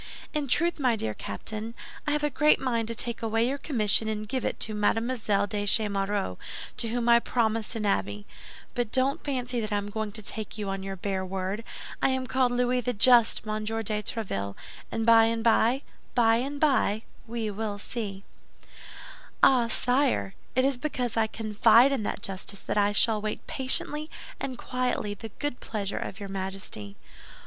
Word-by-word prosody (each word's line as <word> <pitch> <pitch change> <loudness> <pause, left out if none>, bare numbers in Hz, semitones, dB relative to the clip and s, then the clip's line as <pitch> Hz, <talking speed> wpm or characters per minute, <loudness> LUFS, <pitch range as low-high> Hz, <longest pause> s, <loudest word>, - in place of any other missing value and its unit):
In 300 -2 -1
truth, 340 +6 +1
my 250 -4 +3
dear 110 - -2
Captain, 215 - -5 0.3
I - - +2
have 300 0 0
a 295 - +1
great 300 +3 +4
mind 235 -4 0
to 230 - -1
take 235 0 -1
away 225 +1 +1
your 275 +2 -2
commission 220 -6 +1
and 215 -1 -3
give 260 +3 -2
it - - -2
to 215 - -1
Mademoiselle 210 -1 +1
de 205 0 -2
Chemerault, 200 - +1 0.4
to 230 - -2
whom 235 +1 -1
I 235 0 +7
promised 225 -1 0
an 215 -2 -2
abbey. 100 - 0 0.5
But 245 -4 -2
don't 265 +2 +1
fancy 250 -3 -1
that 215 -1 -3
I 205 - +2
am 205 0 -4
going 220 0 -3
to 215 0 -4
take 215 +1 -1
you 205 -2 -3
on 195 0 -3
your 195 0 -5
bare 190 0 -2
word. 190 +3 -3 0.4
I - - +4
am 260 -1 0
called 255 -1 +2
Louis 250 0 +1
the 245 +1 -1
Just, 235 +1 +5
Monsieur 215 +1 -2
de 210 0 -1
Tréville, 100 - -3 0.4
and 225 - -1
by 225 -1 +7
and 225 0 0
by, 235 +4 +3 0.3
by 225 -2 +5
and 275 +4 -3
by 255 -8 +2 0.2
we 225 -2 -3
will 205 0 -3
see." 200 -2 -5 1.2
"Ah, 245 -3 +6
sire; 250 -3 +1 0.2
it 260 +1 +3
is 270 -2 +1
because 250 -5 -2
I 225 -1 +3
confide 225 +4 +4
in 270 -4 0
that 205 - -3
justice 195 +1 -2
that - - -3
I 205 0 +3
shall 215 +1 +3
wait 215 0 -4
patiently 300 +3 0 0.3
and 260 -2 -4
quietly 250 -5 -1
the 220 +2 -8
good 290 -4 -3
pleasure 205 -3 -3
of 195 - -6
your 200 - -6
Majesty." 190 - -5
225 Hz, 185 wpm, -27 LUFS, 205-250 Hz, 1.2 s, I